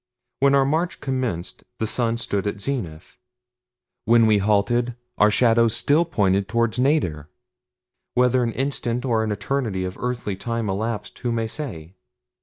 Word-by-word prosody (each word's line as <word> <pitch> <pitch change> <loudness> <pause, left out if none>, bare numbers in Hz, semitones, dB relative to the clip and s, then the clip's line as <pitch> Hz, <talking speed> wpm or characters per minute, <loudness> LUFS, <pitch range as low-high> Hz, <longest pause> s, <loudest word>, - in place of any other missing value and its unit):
When 140 0 +4
our 135 -1 +4
march 160 +5 -1
commenced 125 -10 -3
the 110 - -1
sun 115 +1 0
stood 105 -3 -2
at 100 - -3
zenith. 95 - -5 0.9
When 115 0 +5
we 105 -2 +4
halted 110 +4 +1 0.2
our 105 - +6
shadows 115 0 +3
still 155 +4 +3
pointed 100 - +1
toward 115 +3 0
nadir. 90 - +1 0.9
Whether 125 0 +3
an 115 -2 -1
instant 125 -2 -2
or 115 -3 +1
an 110 - -2
eternity 105 -2 -2
of 90 - -6
earthly 120 -5 -3
time 115 0 -3
elapsed 105 +1 -4
who 120 - -2
may 115 -1 0
say. 105 - -6
115 Hz, 150 wpm, -23 LUFS, 100-125 Hz, 0.9 s, our